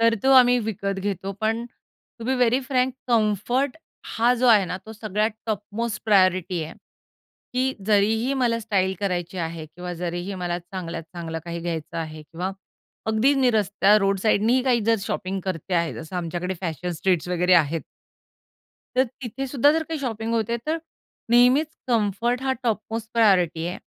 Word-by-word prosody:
तर 230 0 +4
तो 270 - +3
आम्ही 250 -1 +6
विकत 200 -3 -3
घेतो. 195 0 -3
पण 225 +2 0 0.5
to 230 - -7
be 260 +2 +1
very 250 +1 +3
frank 255 0 +1 0.2
comfort 235 - +1 0.4
हा 235 +2 +4
जो 250 +1 +1
आहे 215 -5 +6
ना, 180 +1 -4
तो 220 - -8
सगळ्यात 215 0 -1 0.2
टॉप 210 -3 -1 0.2
मोस्ट 230 -2 -2
प्रायोरिटी 185 -4 +3
आहे. 155 - -8 0.8
की 260 +1 +1
जरीही 220 +5 +2
मला 240 -3 +1
स्टाईल 195 -3 0
करायची 180 -2 -2
आहे 165 -1 -4
किंवा 180 +3 -7
जरीही 175 +3 -4
मला 175 -1 -2
चांगल्यात 175 -1 -6
चांगलं 165 -2 -5
काही 170 0 -5
घ्यायचं 165 -1 -4
आहे 155 -1 -5
किंवा 175 +5 -4 0.6
अगदी 220 +6 +3
निरस्त्या 210 -5 +3
रोड 195 -1 +1
साईडनीही 225 +4 +3
काही 250 -3 +2
जर 230 0 +4
शॉपिंग 190 0 -3
करते 185 -1 -3
आहे 170 -2 +1
जसं 160 +3 -7
आमच्याकडे 175 +2 -3
फॅशन 175 0 -3
स्ट्रीट्स 175 0 0
वगैरे 180 +1 +2
आहेत. 165 -1 +3 1.2
तर 260 - +5
तिथे 260 +1 -6
सुद्धा 280 +2 +4
जर 320 +1 +1
काही 320 -1 -4
शॉपिंग 225 -3 -3
होते, 230 +1 0
तर 320 +2 0 0.5
नेहमीच 250 +6 +5 0.2
कम्फर्ट 235 +2 +1
हा 265 0 +1
टॉपमोस्ट 225 -1 -2
प्रायोरिटी 180 -7 +3
आहे. 180 - -4
205 Hz, 165 wpm, -24 LUFS, 180-235 Hz, 1.2 s, आम्ही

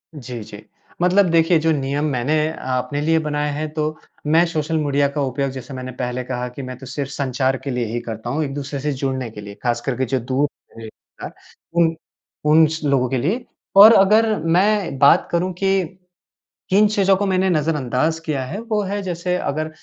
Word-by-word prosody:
जी, 125 -4 -7
जी। 105 0 -11 0.4
मतलब 180 +1 +4
देखिए, 165 +1 +4
जो 160 +1 +1
नियम 140 0 -1
मैंने 130 +4 0 0.4
अपने 145 +3 -2
लिए 160 +2 +2
बनाए 150 -1 -2
हैं, 155 +2 -3
तो, 155 0 -2 0.3
मैं 165 +3 +4
सोशल 160 -1 -2
मीडिया 145 -2 +1
का 145 - 0
उपयोग 135 0 -1
जैसे 130 +1 -8
मैंने 130 0 -6
पहले 125 0 -2
कहा 125 0 -4
कि - - -6
मैं 130 -1 -7
तो 135 - -11
सिर्फ़ 140 +2 -5
संचार 130 -1 -1
के 140 - -4
लिए 125 -1 -1
ही 115 +2 -3
करता 115 0 -6
हूँ, 150 +5 -1
एक-दूसरे 140 0 -4
से 150 +2 -1
जुड़ने 130 -2 -3
के 105 - -9
लिए, 100 0 -9
खास 120 -1 0
करके 130 -1 -1
जो - - +1
दूर 130 +4 0 0.3
ए, 110 - -7
था, - - -12 0.5
उन 165 -1 +3 0.5
उन 155 +2 +6
स 160 +1 -5
लोगों 135 -3 +2
के 130 - 0
लिए। 195 - -1 0.3
और 215 +3 +11
अगर 215 +3 +4
मैं 185 0 +2
बात 140 - +5
करूँ 180 +2 0
कि, 190 -1 -1 0.7
किन 205 +3 +5
चीज़ों 195 -2 +3
को 205 +2 -1
मैंने 190 0 +1
नज़रअंदाज़ 155 -1 0
किया 145 -5 -2
है, 130 +10 -6
वो 225 -2 -1
है 200 +1 -3
जैसे 180 -1 -2
अगर 155 -2 -2
150 Hz, 195 wpm, -20 LUFS, 130-170 Hz, 0.7 s, और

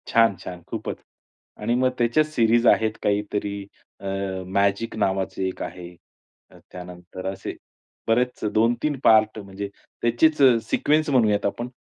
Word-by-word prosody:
छान, 115 -4 +4
छान 90 -1 -7
खूपच! - - -4 0.6
आणि 115 +3 +1
मग 130 +1 +3
त्याच्याच 120 +6 +2
सीरीज 115 0 +4
आहेत 110 -1 +4
काहीतरी 100 -1 -1 0.3
अ, 100 - -11 0.4
मॅजिक 100 +3 0
नावाचे 95 -2 -1
एक 95 - -6
आहे. 90 -1 -8 0.5
अ, - - -17
त्यानंतर 90 +1 -9
असे 95 - -6 0.5
बरेच 125 +2 +1
2-3 120 +6 +1
पार्ट 110 0 +5
म्हणजे 100 0 -6 0.3
त्याचीच 120 +7 +3 0.3
सिक्वेन्स 155 +1 +2
म्हणूयात 110 -7 +3
आपण, 120 +4 -2
110 Hz, 125 wpm, -24 LUFS, 100-120 Hz, 0.6 s, पार्ट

